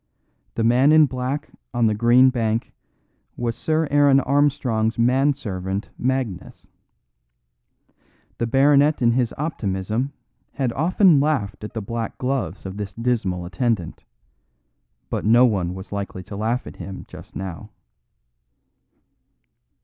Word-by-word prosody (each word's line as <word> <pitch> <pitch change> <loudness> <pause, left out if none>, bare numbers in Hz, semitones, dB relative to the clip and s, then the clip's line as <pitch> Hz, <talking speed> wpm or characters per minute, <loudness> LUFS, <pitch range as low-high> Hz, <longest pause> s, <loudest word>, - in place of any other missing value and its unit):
The 115 - 0
man 125 +5 +4
in 155 0 +7
black 130 +3 -4 0.2
on 120 -1 +2
the 110 - +3
green 120 +4 +5
bank 115 -2 -1 0.6
was 120 -1 -2
Sir 160 0 0
Aaron 145 -1 +5
Armstrong's 130 -5 +1
man 130 +4 +3
servant 95 -5 -5
Magnus. 125 -7 -3 1.7
The 115 - 0
baronet 140 +3 +4
in 115 - +5
his 120 -1 +1
optimism 110 - -2 0.4
had 130 -4 -1
often 170 +1 +4
laughed 135 -10 -1
at 105 - -8
the 110 - -3
black 115 +2 -4
gloves 130 -4 -3
of 95 +1 -6
this 105 -1 -6
dismal 110 -7 -1
attendant; 95 -1 -2 1.1
but - - -2
no 120 +4 +6
one 95 -6 0
was 95 +1 -10
likely 100 -2 -5
to 100 - -9
laugh 115 +4 -1
at - - -10
him 95 -1 -8
just - - -13
now. 95 -4 -6
120 Hz, 125 wpm, -22 LUFS, 105-135 Hz, 1.7 s, in